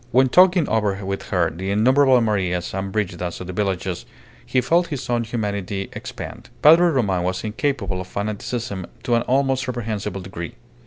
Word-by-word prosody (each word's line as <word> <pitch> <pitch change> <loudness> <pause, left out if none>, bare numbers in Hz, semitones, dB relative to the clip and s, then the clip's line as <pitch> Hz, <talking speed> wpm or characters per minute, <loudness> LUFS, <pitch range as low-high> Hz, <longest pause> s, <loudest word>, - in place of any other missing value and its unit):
When 130 +2 +4
talking 180 +2 +5
over 100 -3 0
with 95 0 -4
her 85 -3 +1
the 95 +4 -5
innumerable 130 +5 +5
Marias 95 -5 0
and 95 0 -3
Brigidas 90 -4 -2
of 90 - -6
the 90 - -6
villages, 95 -2 -2 0.4
he 130 - +1
felt 170 +6 +2
his 140 -5 -5
own 120 -1 +1
humanity 100 -4 -3
expand. - - -8
Padre 165 +4 +8
Roman 105 - +1
was 90 +1 -2
incapable 110 -3 -2
of 90 - -8
fanaticism 100 -1 -4 0.2
to 125 -1 0
an 115 - +4
almost 135 0 +1
reprehensible 110 -6 -3
degree. 85 -2 -7
105 Hz, 165 wpm, -22 LUFS, 95-130 Hz, 0.4 s, Padre